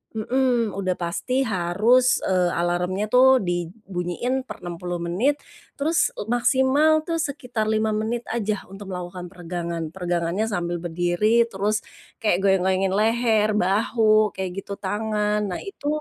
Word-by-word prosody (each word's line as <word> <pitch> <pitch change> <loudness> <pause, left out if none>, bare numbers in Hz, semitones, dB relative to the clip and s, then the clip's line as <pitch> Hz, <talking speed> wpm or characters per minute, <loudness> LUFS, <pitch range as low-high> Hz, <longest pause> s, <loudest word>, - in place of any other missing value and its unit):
mhm, 240 0 +1
udah 185 -2 0
pasti 250 +10 -1
harus, 220 +6 +2
eee, 180 -2 +2
alarmnya 180 +4 0
tuh 260 +1 +6
dibunyiin 180 +7 -3
per - - -8
60 175 0 -5
menit, 190 +13 +1 0.4
terus 325 +4 +2 0.2
maksimal 270 +5 +3
tuh 330 -1 -1
sekitar 250 -7 -2
5 220 0 +1
menit 225 +3 -2
aja 215 -3 -2
untuk 195 0 -9
melakukan 180 0 -6
peregangan. 170 -2 -4
Peregangannya 175 +2 -1
sambil 175 -5 -2
berdiri 175 +7 +2
terus, 205 +2 -1 0.4
kayak 185 -4 +3
goyang-goyangin 190 0 +2
leher, 220 0 +2
bahu 215 +2 +3
kayak 190 -1 -3
gitu 200 - -6
tangan 210 +1 -1
nah 180 - -3
itu, 395 -7 -7
210 Hz, 125 wpm, -23 LUFS, 180-235 Hz, 0.4 s, tuh